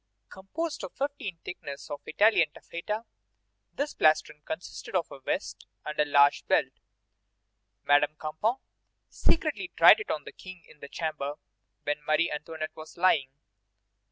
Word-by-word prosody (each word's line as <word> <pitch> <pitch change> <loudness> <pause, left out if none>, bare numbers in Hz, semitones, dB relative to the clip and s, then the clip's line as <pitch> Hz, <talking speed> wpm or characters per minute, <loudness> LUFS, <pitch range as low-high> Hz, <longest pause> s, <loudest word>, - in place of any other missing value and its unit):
Composed 300 - -5
of - - -6
fifteen 275 -10 -3
thicknesses 140 -5 -7
of 145 - -5
Italian 195 -3 +4
taffeta, 210 +9 -5 0.7
this 290 +1 -3
plastron 155 -1 +2
consisted 165 +4 -6
of 175 -3 0
a - - -9
vest 130 - -3 0.2
and 150 - -5
a 150 - +5
large 145 -1 +5
belt. - - +3 1.1
Madame 145 +1 +4
Campan 155 - -1 0.5
secretly 320 +2 0
tried - - +9
it 425 - -6
on - - -1
the - - -9
King 185 -2 -11
in 150 - -18
the 140 - -9
chamber 150 -3 -3 0.5
where 145 +1 0
Marie 155 +2 +3
Antoinette 155 +1 -5
was 155 +2 -11
lying. 165 -7 +3
160 Hz, 140 wpm, -28 LUFS, 150-200 Hz, 1.1 s, tried